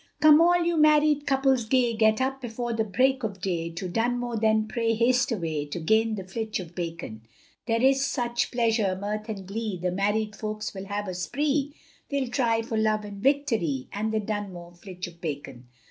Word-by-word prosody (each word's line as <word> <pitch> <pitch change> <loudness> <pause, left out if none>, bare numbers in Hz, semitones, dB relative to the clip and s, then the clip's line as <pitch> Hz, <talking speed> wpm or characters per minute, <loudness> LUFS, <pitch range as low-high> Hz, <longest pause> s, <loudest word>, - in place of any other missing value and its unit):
Come 310 0 +7
all 350 +1 +4
you 340 -1 +1
married 300 -1 +4
couples 270 -3 +2
gay, 245 0 +2
Get 220 0 +3
up 270 +1 -1
before 240 0 -3
the 225 -1 +1
break 255 +5 +2
of 205 -4 -4
day, 170 -3 -2
To 180 +2 -4
Dunmow 240 +3 -1
then 220 -1 +3
pray 225 0 0
haste 250 +4 +2
away, 160 -8 -2
To 145 - -5
gain 220 +6 +2
the 195 - -5
flitch 215 +3 -4
of 175 -2 -8
bacon; 165 -11 -5 0.5
There 230 +1 +1
is 270 0 +4
such 240 -3 -1
pleasure, 225 -6 +1
mirth 210 +2 -4
and 195 -3 -5
glee, 215 -1 -3
The 180 +1 -1
married 210 +3 0
folks 215 +1 -4
will 190 -1 -7
have 205 +1 -3
a 185 - -3
spree, 285 +9 -1 0.3
They'll 275 -3 -1
try 230 -4 +1
for 225 -1 -3
love 215 -1 +1
and 200 -1 -8
victory, 225 - +1
And 215 +2 -1
the 220 - +1
Dunmow 200 -5 -5
Flitch 180 0 -8
of 170 -1 -12
Bacon. 140 -5 -6
220 Hz, 190 wpm, -26 LUFS, 190-250 Hz, 0.5 s, Come